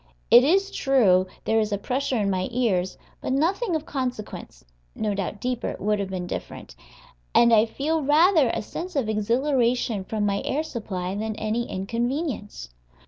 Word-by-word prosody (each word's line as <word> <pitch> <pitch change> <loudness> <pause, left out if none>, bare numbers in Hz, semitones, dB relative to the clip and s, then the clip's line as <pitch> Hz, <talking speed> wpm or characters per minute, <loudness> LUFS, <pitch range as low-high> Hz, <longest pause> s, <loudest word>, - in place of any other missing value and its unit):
It 240 - +9
is 390 +7 +2
true 200 -10 +3 0.2
there 225 0 +2
is 215 -1 0
a 205 - 0
pressure 255 +5 -1
in 200 -2 +1
my 185 -1 -1
ears, 215 -7 0 0.2
but - - -3
nothing 350 - +1
of 315 -1 -3
consequence 250 - -5 0.3
(no 210 -1 -1
doubt 200 +1 -3
deeper 250 +1 -2
it - - -6
would 210 +1 0
have 195 -1 -3
been 185 -2 -4
different), - - -7 0.6
and 235 -1 +6
I 220 +1 +5
feel 305 +7 -1
rather 305 0 +4
a - - -2
sense 360 - -6
of 265 -6 0
exhilaration 235 0 +1
from 210 +2 -2
my 200 -1 0
air 300 +3 -1
supply 190 - -4
than 215 +1 -3
any 220 +2 -2
inconvenience. 230 - -3
230 Hz, 170 wpm, -25 LUFS, 205-275 Hz, 0.6 s, It